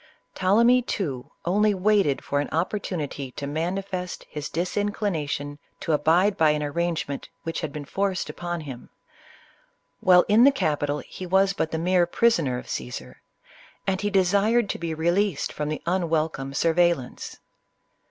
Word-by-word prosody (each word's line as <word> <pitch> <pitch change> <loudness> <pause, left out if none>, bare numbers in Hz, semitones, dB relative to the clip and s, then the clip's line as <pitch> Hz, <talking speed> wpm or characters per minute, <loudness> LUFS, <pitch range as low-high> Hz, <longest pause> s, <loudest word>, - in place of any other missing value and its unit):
Ptolemy, 235 +7 +4
too, 145 - -3 0.2
only 205 +4 +3
waited 195 -7 +2
for 145 - -1
an 145 - -1
oppor 180 +6 -1
tunity 145 -8 -5
to 140 - -4
manifest 180 +4 -3
his 150 -1 -5
disinclination 170 -6 -2 0.2
to 160 - -1
abide 170 +7 +3
by 160 -1 +5
an 150 0 +1
ar 145 - -3
rangement 170 -4 -2
which 165 - -3
had 155 - -3
been 150 -1 -6
forced 195 +4 -1
upon 175 -1 -4
him. 135 -5 -9 1.1
While 180 -1 +6
in 215 +3 +6
the 280 - +8
capital, 145 - -1
he 185 - -8
was 190 +2 +3
but 160 - -1
the 160 - -2
mere 175 +1 +2
prisoner 170 - +2
of - - -8
Caesar, 65 - -6 0.6
and 190 0 0
he 205 - 0
desired 200 +4 +3
to - - -6
be 165 -1 -3
released 175 +1 0
from 150 0 -3
the 155 - -4
unwelcome 160 -6 -1
sur 165 +2 +2
veillance. 170 -7 0
170 Hz, 155 wpm, -25 LUFS, 150-195 Hz, 1.1 s, the